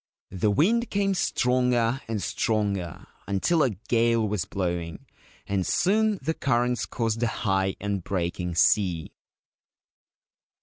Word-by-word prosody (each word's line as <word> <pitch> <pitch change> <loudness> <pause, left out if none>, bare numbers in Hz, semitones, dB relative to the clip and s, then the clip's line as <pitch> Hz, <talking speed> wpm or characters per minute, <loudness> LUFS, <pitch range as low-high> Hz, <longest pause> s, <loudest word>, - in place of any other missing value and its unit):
The 95 +3 0
wind 220 - +2
came 200 -1 +1
stronger 125 -6 +1
and 110 -3 -3
stronger, 100 -6 -1 0.2
until 100 - +1
a 135 - +3
gale 115 +2 +1
was 100 -3 -2
blowing, 85 -4 -4 0.4
and 100 -2 -1
soon 210 - +2
the 160 +4 0
currents 125 -4 0
caused 115 -1 -2
a 120 - +2
high 95 -4 0
and 100 -3 -3
breaking 90 -2 -2
sea. 85 -2 +2
110 Hz, 120 wpm, -26 LUFS, 95-125 Hz, 0.4 s, a